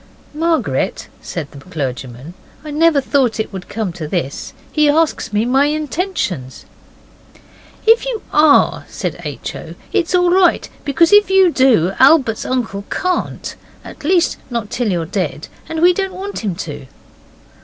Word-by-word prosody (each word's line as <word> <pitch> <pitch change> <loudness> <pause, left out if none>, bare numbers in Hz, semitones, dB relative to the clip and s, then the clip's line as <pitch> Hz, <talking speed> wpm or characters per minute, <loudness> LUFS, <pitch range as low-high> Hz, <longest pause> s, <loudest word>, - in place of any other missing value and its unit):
'Margaret,' 325 +1 -1
said 155 -5 -6
the 140 - -11
clergyman, 135 -2 -6 0.3
'I 300 - -6
never 310 -1 +3
thought 260 -5 +1
it 220 - -3
would 185 -2 -8
come 215 -5 -3
to 165 -3 -6
this: 150 -5 -4 0.2
he 300 -1 +3
asks 315 -4 +1
me 210 +2 +1
my 265 +3 +3
intentions.' 300 - -3 1.2
'If 455 +2 +5
you 475 -4 -3
ARE,' 300 -1 +4
said - - -5
H. - - -6
O., - - -9 0.2
'it's 365 -3 +1
all 355 -1 +3
right, 365 -1 +3 0.2
because 330 +6 +3
if 415 -1 +6
you 385 -2 +5
do 245 - +3
Albert's 265 -5 +4
uncle 230 -6 -2
can't 365 -1 -2 0.3
at - - -11
least, 345 +2 +2
not 235 -4 -4
till 245 -3 -1
you're 170 -2 -1
dead. 160 -4 -3 0.2
And 320 0 -2
we 360 +1 +6
don't 385 0 -2
want 390 +2 -5
him 195 -5 -2
to. 150 -5 -7
275 Hz, 155 wpm, -17 LUFS, -, 1.2 s, if